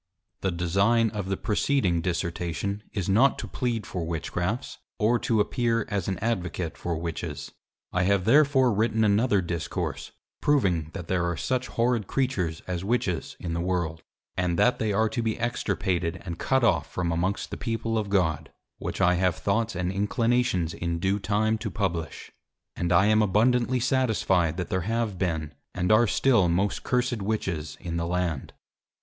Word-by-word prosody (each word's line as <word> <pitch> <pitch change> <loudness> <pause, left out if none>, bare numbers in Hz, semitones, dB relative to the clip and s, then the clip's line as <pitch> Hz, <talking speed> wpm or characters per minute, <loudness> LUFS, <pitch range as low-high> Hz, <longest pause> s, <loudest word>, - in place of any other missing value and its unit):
The 95 - +1
Design 100 +7 +2
of 100 -3 -4
the 95 - 0
preceding 105 -6 +1
Dissertation, 85 +3 -2
is 95 -4 -3
not 115 +8 +4
to - - -5
plead 120 -4 -2
for 90 - -4
Witchcrafts, 85 - -3 0.2
or 115 +2 +2
to 115 -2 +1
appear 115 0 +1
as 100 -4 -2
an 95 -2 -1
Advocate 90 -6 -2
for 85 -2 -3
Witches: 85 -2 -5 0.4
I 90 - +2
have 100 -1 +2
therefore 135 -1 +5
written 110 +1 +1
another 105 0 +3
Discourse, 85 -3 -4 0.3
proving 95 - +2
that 90 -4 -6
there 85 -2 +1
are 85 - -3
such 130 - -1
horrid 115 -3 0
Creatures 95 -12 -1
as 90 -1 -3
Witches 100 -5 -1
in 85 -2 -4
the 85 - -1
World; 85 -3 -1 0.3
and 90 -2 0
that 125 +5 +3
they 110 -1 0
are 110 +2 +2
to 110 +2 -2
be 110 -1 -1
extirpated 95 -7 -1
and 85 -2 -5
cut 130 -1 +1
off 95 -7 +2
from 85 -2 -1
amongst 90 +4 -1
the - - -3
People 115 -2 -2
of 105 -2 -1
God, 80 -6 0 0.3
which - - -4
I 90 - +5
have 90 -1 +2
Thoughts 110 +2 0
and 90 0 -1
Inclinations 115 -3 +1
in 85 -1 -2
due 95 +4 0
time 110 +2 +1
to 110 -1 -3
publish; 85 -3 -3 0.4
and 85 0 -1
I 90 +3 +5
am 110 +1 +4
abundantly 120 +5 +2
satisfied 110 -10 +1
that 90 - -3
there 95 - 0
have 110 -1 -1
been, 80 -5 -1 0.2
and 90 +2 +1
are 110 +2 +5
still 115 -7 +3
most 95 +4 0
cursed 125 -3 0
Witches 95 -7 -2
in 85 -1 -4
the 85 0 -1
Land. 90 -5 -2
100 Hz, 170 wpm, -26 LUFS, 85-115 Hz, 0.4 s, therefore